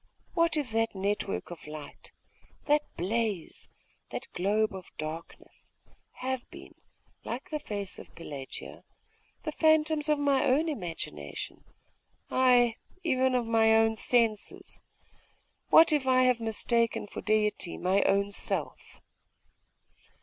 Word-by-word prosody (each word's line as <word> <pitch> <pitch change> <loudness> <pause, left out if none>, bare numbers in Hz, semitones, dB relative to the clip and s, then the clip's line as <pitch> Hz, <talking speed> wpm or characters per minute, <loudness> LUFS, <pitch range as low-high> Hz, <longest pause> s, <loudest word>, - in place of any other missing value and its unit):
What 335 -3 +2
if 280 -6 -2
that 225 -1 0
network 195 -1 -2
of 170 -3 -10
light, 150 -1 -10 0.5
that 295 +1 +4 0.2
blaze, 205 0 -2 0.4
that - - -5
globe 210 +4 +1
of 190 -1 -9
darkness, 155 +2 -8 0.4
have 260 -1 -4
been, - - -12 0.5
like 245 +7 -6
the 305 - -1
face 200 -7 -5
of - - -13
Pelagia, 140 -5 -8 0.6
the 310 - -2
phantoms 315 -1 +3
of 300 - +4
my 280 -2 +2
own 290 +6 +3
imagination 165 - -6 0.7
ay, 245 -2 +4 0.3
even 260 -5 +2
of 245 -2 +1
my 225 -1 +4
own 225 0 +4
senses? 225 -2 0 0.9
What 320 -1 +8
if 285 -3 +1
I 255 0 +5
have 250 -2 +3
mistaken 230 +1 0
for 205 - -7
Deity 210 -4 0
my 190 +2 +2
own 200 +1 +2
self? - - -1
225 Hz, 120 wpm, -29 LUFS, 200-260 Hz, 0.9 s, What